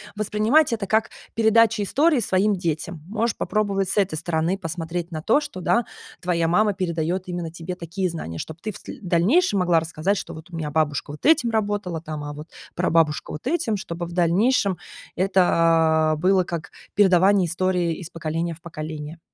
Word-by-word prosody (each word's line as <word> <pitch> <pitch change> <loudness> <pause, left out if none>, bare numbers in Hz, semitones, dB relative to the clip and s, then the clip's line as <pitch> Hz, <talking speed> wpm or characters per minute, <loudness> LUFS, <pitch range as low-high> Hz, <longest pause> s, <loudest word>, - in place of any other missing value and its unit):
воспринимать 215 +7 +2
это 215 -3 -3
как 220 +2 +1 0.2
передача 225 -1 +4
истории 290 - +3
своим 205 -1 +2
детям. 165 -2 -3
Можешь 220 +3 -1
попробовать 200 -3 0
с 190 - -1
этой 195 -5 +2
стороны 165 +3 -1
посмотреть 170 0 -4
на 155 -1 -4
то, 225 - +3
что, 290 -11 -7
да, 235 +6 +2 0.3
твоя 170 -2 0
мама 205 +5 +3
передает 175 -1 -2
именно 175 -2 -4
тебе 170 +2 -6
такие 180 +2 -3
знания, 85 - -6
чтоб 160 - -6
ты 215 - -3
в - - -10
сл - - -10
дальнейшем 200 - +3
могла 175 -2 +3
рассказать, 165 +5 -1
что: - - -6
"Вот 160 +1 -11
у 175 - -9
меня 155 -2 -3
бабушка 145 -2 0
вот 150 - -10
этим 300 -7 +4
работала 205 -6 -1
там, 155 -2 -6
а 145 0 -5
вот 150 +2 -9 0.3
прабабушка 165 -3 +1
вот 150 - -7
этим". 260 -6 0
Чтобы 175 -2 -5
в 170 - -9
дальнейшем 185 +3 +2 0.4
это 165 -4 +3
было 185 +3 +3
как 170 0 -6 0.2
передавание 190 -1 +4
истории 180 0 0
из 175 -3 -8
поколения 165 0 -3
в 165 - -22
поколение. 155 -1 -7
180 Hz, 175 wpm, -23 LUFS, 165-205 Hz, 0.4 s, передача